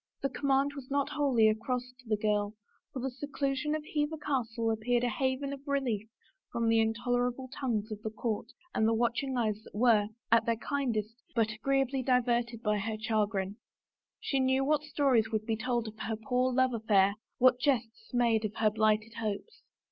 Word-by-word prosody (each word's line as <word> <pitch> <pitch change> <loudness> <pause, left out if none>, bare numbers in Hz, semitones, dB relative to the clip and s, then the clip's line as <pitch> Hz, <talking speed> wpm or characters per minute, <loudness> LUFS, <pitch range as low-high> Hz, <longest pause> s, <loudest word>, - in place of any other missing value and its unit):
The 275 - +2
command 275 +1 +1
was 275 -3 -9
not 280 0 +1
wholly 275 -7 +3
a 215 - +5
cross 250 +3 -3
to 250 -3 -16
the 215 - +2
girl, 210 0 0 0.4
for 260 - -5
the 265 - -1
seclusion 280 +2 -2
of 310 - -4
Hever 300 +1 -1
Castle 235 -6 -1
appeared 240 +2 +1
a 245 - +2
haven 265 +3 -1
of 275 - -8
relief 245 -7 -1 0.4
from 230 -1 0
the 225 0 +4
intolerable 245 +3 0
tongues 225 -5 -2
of 210 -1 -5
the 220 - -3
court 220 0 -3 0.3
and 220 - +2
the 225 - +3
watching 240 +3 0
eyes 215 -3 0
that - - -15
were, 215 -2 +4 0.2
at 230 0 +4
their 230 - +3
kindest, 230 -3 -2
but 225 -2 +2
agreeably 270 +3 0
diverted 240 -2 +1
by 210 -1 +1
her 220 +2 -3
chagrin. 210 -2 0 0.6
She 275 - -1
knew 260 +1 +2
what 300 0 +2
stories 275 -7 +2
would 215 -1 -2
be 225 -1 0
told 235 0 -1
of 220 0 -9
her 220 +2 -2
poor 250 +3 0
love 260 0 +2
affair; 205 -3 +3 0.2
what 250 0 +5
jests 245 - -1
made 235 -3 +2
of 215 0 -3
her 215 -1 +2
blighted 215 +1 +1
hopes. 215 - -4
235 Hz, 185 wpm, -31 LUFS, 220-265 Hz, 0.6 s, a